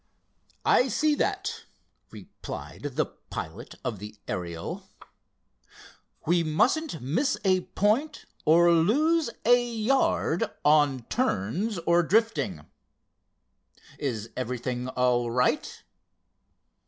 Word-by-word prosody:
"I 250 Hz, -, +4 dB
see 300 Hz, +5 st, +2 dB
that," 410 Hz, +7 st, -2 dB, 0.4 s
replied 145 Hz, -2 st, -8 dB
the -, -, +2 dB
pilot -, -, -8 dB
of 105 Hz, -, -3 dB
the 105 Hz, +1 st, -9 dB
Ariel. 85 Hz, -4 st, -5 dB, 1.4 s
"We 170 Hz, +1 st, +3 dB
mustn't 220 Hz, -, +1 dB
miss 245 Hz, -, 0 dB
a 185 Hz, -1 st, +2 dB
point, 230 Hz, +10 st, +1 dB, 0.2 s
or 170 Hz, +2 st, +5 dB
lose 285 Hz, -, +3 dB, 0.2 s
a 245 Hz, +1 st, +5 dB
yard, 235 Hz, -6 st, +1 dB, 0.2 s
on 145 Hz, -4 st, +4 dB
turns 195 Hz, -, -1 dB
or 170 Hz, +1 st, +3 dB
drifting. 185 Hz, -, 0 dB, 1.3 s
Is 115 Hz, -5 st, -3 dB
everything 125 Hz, 0 st, -3 dB
all 125 Hz, -2 st, +1 dB
right?" 125 Hz, +2 st, 0 dB
170 Hz, 90 wpm, -27 LUFS, -, 1.4 s, or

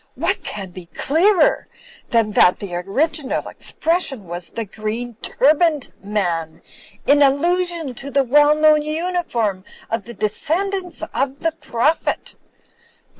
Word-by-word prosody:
What -, -, 0 dB
can 195 Hz, -3 st, -6 dB
be 175 Hz, -1 st, -11 dB
clearer 330 Hz, -, +2 dB, 0.4 s
than 230 Hz, -2 st, +2 dB
that 180 Hz, -3 st, +5 dB
the 200 Hz, -3 st, -7 dB
original 260 Hz, -, -1 dB
expression, 315 Hz, -, -1 dB
was 175 Hz, 0 st, -5 dB
'the 230 Hz, -, -4 dB
green 220 Hz, +4 st, -5 dB
turban'd 300 Hz, 0 st, +2 dB
man,' 175 Hz, -6 st, -2 dB, 0.4 s
in 290 Hz, +1 st, +4 dB
allusion 335 Hz, +1 st, +2 dB
to 275 Hz, +3 st, -7 dB
the 280 Hz, 0 st, +2 dB
well 295 Hz, +4 st, +5 dB
known 305 Hz, 0 st, +5 dB
uniform 305 Hz, -, -2 dB, 0.3 s
of 225 Hz, -2 st, -2 dB
the 235 Hz, -, -9 dB
descend 310 Hz, -, 0 dB
ants 360 Hz, -5 st, -5 dB
of 275 Hz, +2 st, -2 dB
the 330 Hz, -, +1 dB
Prophet? 305 Hz, -1 st, -1 dB
275 Hz, 125 wpm, -20 LUFS, 210-320 Hz, 0.4 s, that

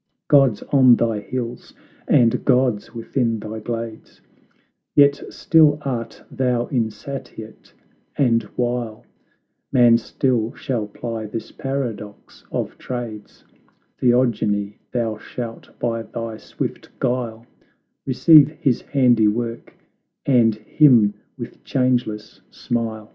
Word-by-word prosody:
Gods 135 Hz, -7 st, +4 dB
on 130 Hz, -3 st, +7 dB
thy 115 Hz, -3 st, 0 dB
hills, 120 Hz, +2 st, -6 dB, 0.3 s
and 115 Hz, -2 st, +3 dB
gods 125 Hz, -6 st, +1 dB
within 115 Hz, 0 st, -1 dB
thy 110 Hz, +1 st, -6 dB
glades,, 115 Hz, 0 st, -6 dB, 0.8 s
Yet 140 Hz, 0 st, +5 dB
still 155 Hz, -3 st, +4 dB
art 120 Hz, -4 st, -4 dB
thou 125 Hz, -2 st, 0 dB
insatiate, 115 Hz, -1 st, -5 dB, 0.5 s
and 115 Hz, -4 st, +3 dB
while, 120 Hz, -3 st, -2 dB, 0.7 s
Man 120 Hz, -2 st, +5 dB
still 120 Hz, -1 st, -1 dB
shall 115 Hz, -5 st, -3 dB
ply 110 Hz, +1 st, -6 dB
this 110 Hz, +2 st, -6 dB
paradox 120 Hz, -7 st, -6 dB
of -, -, -4 dB
trades, 115 Hz, -4 st, -7 dB, 0.6 s
Theogony, 110 Hz, -5 st, +1 dB
thou 115 Hz, -3 st, -2 dB
shalt 115 Hz, 0 st, -7 dB
by 115 Hz, -1 st, -2 dB
thy 115 Hz, 0 st, -6 dB
swift -, -, -6 dB
guile 120 Hz, -3 st, -2 dB, 0.6 s
Receive 150 Hz, +2 st, +6 dB
his 135 Hz, -7 st, +1 dB
handiwork, 120 Hz, -3 st, +1 dB, 0.5 s
and 120 Hz, -5 st, +4 dB
him 110 Hz, -1 st, +4 dB, 0.2 s
with -, -, -9 dB
changeless 120 Hz, -6 st, -1 dB
smile! 115 Hz, -3 st, -4 dB
120 Hz, 100 wpm, -21 LUFS, 110-130 Hz, 0.8 s, on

